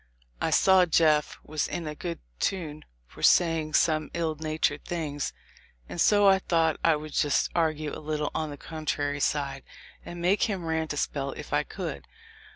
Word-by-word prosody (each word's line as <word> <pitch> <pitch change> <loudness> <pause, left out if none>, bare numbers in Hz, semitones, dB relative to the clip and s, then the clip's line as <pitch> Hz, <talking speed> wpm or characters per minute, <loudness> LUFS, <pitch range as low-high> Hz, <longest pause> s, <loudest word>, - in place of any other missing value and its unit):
I - - +1
saw 190 -2 +5
Jeff 155 -2 +3
was 155 -1 -2
in 170 - -4
a 150 - -4
good 170 +2 -5 0.2
tune 155 -6 -2 0.2
for - - -15
saying 165 -3 +3
some 155 -2 +2
ill 165 -2 0
natured 155 -1 -1
things, 150 -5 -3 0.6
and 170 - -3
so 205 -1 +5
I 190 -1 +6
tho't 165 -2 +2
I 165 -1 +5
would 150 0 -7
just 145 - +1
argue 155 -3 0
a - - -7
little 150 -1 -2
on 155 -1 -2
the 145 - -7
contrary 145 -2 -3
side, 140 -2 -1 0.4
and 175 - -8
make 180 +4 +2
him 190 -5 -3
rant 160 -1 -1
a - - -6
spell 140 -1 -2
if - - -8
I - - +3
could. 70 -3 -6
155 Hz, 175 wpm, -27 LUFS, 150-170 Hz, 0.6 s, I